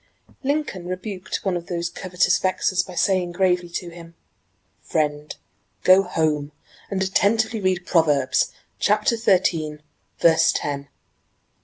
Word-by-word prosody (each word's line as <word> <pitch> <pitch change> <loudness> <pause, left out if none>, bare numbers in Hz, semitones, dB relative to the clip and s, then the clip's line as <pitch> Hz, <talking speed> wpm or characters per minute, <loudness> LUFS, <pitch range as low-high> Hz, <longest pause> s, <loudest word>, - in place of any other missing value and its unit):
Lincoln 280 - -2
rebuked 185 +1 -5
one 190 -2 +1
of 170 -1 -5
these 170 -1 -2
covetous 180 +1 0
vexers 185 0 +1
by 180 - -10
saying 180 -1 +1
gravely 180 -1 +1
to 175 0 -5
him: 170 0 -13 0.7
"Friend, 150 -1 -2 0.5
go 185 +1 +7
home 155 -5 -1 0.4
and 190 -1 -1
attentively 220 +3 +1
read 185 -2 0
'Proverbs,' 145 -6 +2 0.3
chapter 210 +3 +2
thirteen, 170 -8 +1 0.4
verse 160 -1 +5
ten." 140 -1 -3
180 Hz, 120 wpm, -23 LUFS, 165-190 Hz, 0.7 s, go